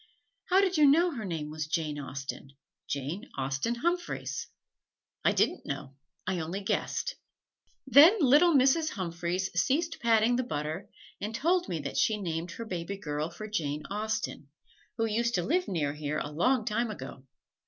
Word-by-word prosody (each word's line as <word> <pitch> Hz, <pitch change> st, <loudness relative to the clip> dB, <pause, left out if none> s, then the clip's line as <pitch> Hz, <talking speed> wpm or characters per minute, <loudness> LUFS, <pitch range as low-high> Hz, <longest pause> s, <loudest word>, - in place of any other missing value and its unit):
"How 380 Hz, +1 st, +4 dB
did 375 Hz, -3 st, +1 dB
you 300 Hz, -1 st, +7 dB
know 335 Hz, +5 st, +5 dB
her 230 Hz, -8 st, -5 dB
name 160 Hz, -4 st, -4 dB
was 155 Hz, 0 st, -4 dB
Jane 155 Hz, -2 st, -1 dB
Austen 135 Hz, 0 st, -6 dB, 0.3 s
Jane 150 Hz, -, -4 dB
Austen 135 Hz, -, -1 dB
Humphreys?" 345 Hz, +7 st, -2 dB, 0.8 s
"I -, -, +5 dB
didn't -, -, +1 dB
know 135 Hz, -, -5 dB, 0.3 s
I 185 Hz, -1 st, -1 dB
only 170 Hz, +5 st, -3 dB
guessed." 480 Hz, -, -1 dB, 0.7 s
Then 290 Hz, -, +8 dB
little 300 Hz, +3 st, +6 dB
Mrs. 275 Hz, +4 st, +4 dB
Humphreys 180 Hz, 0 st, -2 dB
ceased 325 Hz, +5 st, +1 dB
patting 230 Hz, +1 st, +4 dB
the 255 Hz, -, +1 dB
butter 160 Hz, -1 st, -4 dB, 0.3 s
and 215 Hz, +2 st, -3 dB
told 350 Hz, +7 st, +1 dB
me 170 Hz, -, -1 dB
that 140 Hz, -1 st, -5 dB
she 215 Hz, -1 st, +2 dB
named 170 Hz, -2 st, -3 dB
her 230 Hz, -, -6 dB
baby 185 Hz, -1 st, -4 dB
girl 150 Hz, -4 st, -3 dB
for 215 Hz, +5 st, -8 dB
Jane 150 Hz, -8 st, -2 dB
Austen, 215 Hz, -8 st, -3 dB, 0.5 s
who 225 Hz, -, +1 dB
used 235 Hz, +2 st, 0 dB
to 175 Hz, -, +1 dB
live 360 Hz, -, +1 dB
near 150 Hz, -6 st, -1 dB
here 150 Hz, 0 st, -3 dB
a 145 Hz, -, -3 dB
long 220 Hz, -, +2 dB
time 225 Hz, +2 st, 0 dB
ago. 135 Hz, -7 st, -8 dB
205 Hz, 165 wpm, -29 LUFS, 155-260 Hz, 0.8 s, Then